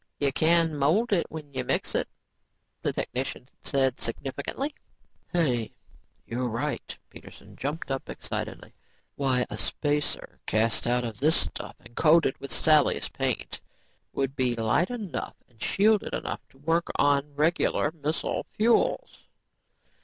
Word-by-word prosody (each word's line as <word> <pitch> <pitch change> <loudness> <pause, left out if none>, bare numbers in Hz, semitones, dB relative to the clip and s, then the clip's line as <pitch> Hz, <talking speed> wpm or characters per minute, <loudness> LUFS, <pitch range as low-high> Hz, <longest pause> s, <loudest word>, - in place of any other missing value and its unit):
"You 140 -1 +3
can 165 +2 +3
mold 170 +12 +3
it 175 - +2
when 150 -3 -8
you 130 -1 -1
mix - - 0
it," - - +1 0.7
the - - +1
technician 130 0 -3 0.2
said 135 -2 +1
significantly. 140 - -3 0.6
"Hey, 130 -11 +1 0.5
you're 125 +1 -2
right," 115 +1 -3
Peterson - - -13
jumped 145 +1 -3
up 135 - -3
excitedly. - - -5 0.4
"Why, 130 -3 +2
a 105 - -6
spacer 145 +5 -1
cast 110 +2 +1
out 125 0 +2
of 115 -2 -5
this 155 +4 +5
stuff 85 - -2
and - - -16
coated 160 -3 +5
with 140 - -7
Sally's 155 -3 +3
paint - - -2 0.5
would 135 0 -1
be 125 -3 +1
light 115 +10 +2
enough 220 -9 -4
and 115 -3 -27
shielded 210 +1 +3
enough - - -3
to - - -23
work 165 +4 +1
on 145 0 +2
regular 155 -1 +2
missile 155 0 -2
fuels." 235 - +2
145 Hz, 135 wpm, -27 LUFS, 125-165 Hz, 0.7 s, this